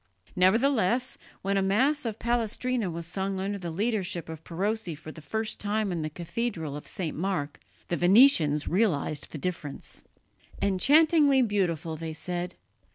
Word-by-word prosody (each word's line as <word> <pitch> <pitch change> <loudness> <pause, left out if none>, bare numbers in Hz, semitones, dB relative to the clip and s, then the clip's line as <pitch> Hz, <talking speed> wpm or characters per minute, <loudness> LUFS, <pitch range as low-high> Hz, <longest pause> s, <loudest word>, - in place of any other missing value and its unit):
Nevertheless, 235 +4 +2 0.2
when 195 +1 +1
a - - +3
Mass 255 +10 +2
of 220 -2 -4
Palestrina 235 -1 -1
was 170 0 -4
sung 190 +2 -2
under 200 +1 -2
the 175 -2 -5
leadership 190 -3 -1
of 160 -1 -8
Perosi 195 0 -2
for 155 +1 -10
the 160 - -11
first 220 +7 -3
time 210 0 -1
in 170 -2 -2
the 155 - -2
cathedral 170 -2 -4
of 150 - -8
St. 175 -6 -3
Mark, 165 -5 -2 0.3
the 175 - 0
Venetians 175 - +5
realized 160 -7 0
the - - -6
difference. 150 -3 -5 0.6
"Enchantingly 285 - +4
beautiful," 175 -7 -1
they 160 0 -5
said. 175 +2 -4
190 Hz, 150 wpm, -28 LUFS, 165-225 Hz, 0.6 s, Venetians